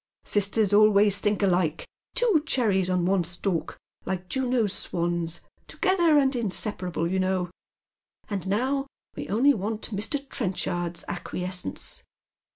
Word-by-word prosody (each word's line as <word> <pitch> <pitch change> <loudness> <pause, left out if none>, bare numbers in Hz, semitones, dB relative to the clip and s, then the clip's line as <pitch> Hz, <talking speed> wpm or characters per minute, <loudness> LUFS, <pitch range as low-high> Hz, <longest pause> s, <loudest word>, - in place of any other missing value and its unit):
Sisters 205 0 +2
always 205 -1 +6
think 210 0 0
alike 180 -5 +1
— - - -48
two 455 -10 +3
cherries 200 - +2
on 180 -1 +1
one 190 -1 +2
stalk, 175 +1 -3 0.3
like 185 -1 -4
Juno's 250 -6 0
swans, 170 -3 -2 0.3
together 345 -5 +3
and 270 -2 +3
inseparable, 190 -6 -1
you 190 +2 0
know; 185 -1 0 0.8
and 195 -3 -4
now 265 +7 0 0.3
we - - -6
only 255 +8 +4
want 215 +1 -4
Mr. 210 +7 0
Trenchard's 175 -7 -3
acquiescence." 180 - -5
200 Hz, 125 wpm, -26 LUFS, 180-235 Hz, 0.8 s, always